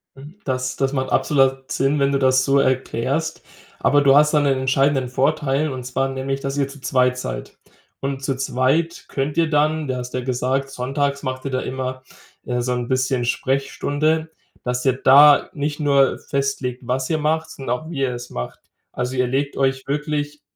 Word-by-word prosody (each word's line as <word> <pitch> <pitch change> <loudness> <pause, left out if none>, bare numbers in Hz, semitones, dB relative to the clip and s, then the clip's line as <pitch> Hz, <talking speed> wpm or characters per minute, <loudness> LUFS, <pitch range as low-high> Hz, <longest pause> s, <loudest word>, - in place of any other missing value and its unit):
Mhm. 145 +6 -12
Das 130 -1 -2
das 135 +1 0
macht 130 -1 -2
absolut 135 -2 +2
Sinn, 140 +2 +1
wenn 140 0 +2
du 140 - +1
das 130 -1 +3
so 140 0 +3
erklärst. 130 +4 -1 0.4
Aber, 145 - +3
du 140 -1 +5
hast 150 +1 +5
dann 150 -1 +4
'nen 135 -2 +2
entscheidenden 135 0 +2
Vorteil 145 +2 +1
und 130 -1 -5
zwar 135 +2 -1
nämlich, 135 +1 -3
dass 135 +1 -4
ihr 140 - +1
zu 140 -1 -12
zweit 125 -1 +2
seid. 125 - -6 0.4
Und, 135 0 -4
zu 135 -1 -1
zweit 135 +6 0
könnt 145 +3 -3
ihr 165 -2 +3
dann 155 0 +1
du 130 - -1
hast 125 0 -6
ja 130 - -1
gesagt, 130 +2 -1
Sonntags 140 +2 -2
macht 130 0 -4
ihr 135 - -2
da 130 - 0
immer, 130 0 -4 0.4
ja, 125 -1 -2
so 125 +1 -1
'n 120 -1 -3
bisschen 130 -1 0
Sprechstunde, 145 +5 0 0.3
dass 125 0 -2
ihr 130 - +4
da 140 +3 +6
nicht 150 +1 -3
nur 140 -2 +3
festlegt, 135 -3 -2
was 130 +1 -1
ihr 160 - +1
macht, 160 +2 0
sondern 125 -2 -3
auch 160 - -11
wie 155 -5 -5
ihr 130 -2 0
es 120 0 -8
macht. - - -6 0.3
Also, 125 +1 -3
ihr 125 -1 +1
legt 140 +3 -1
euch 135 0 0
wirklich, 150 0 -2
135 Hz, 195 wpm, -21 LUFS, 130-145 Hz, 0.4 s, da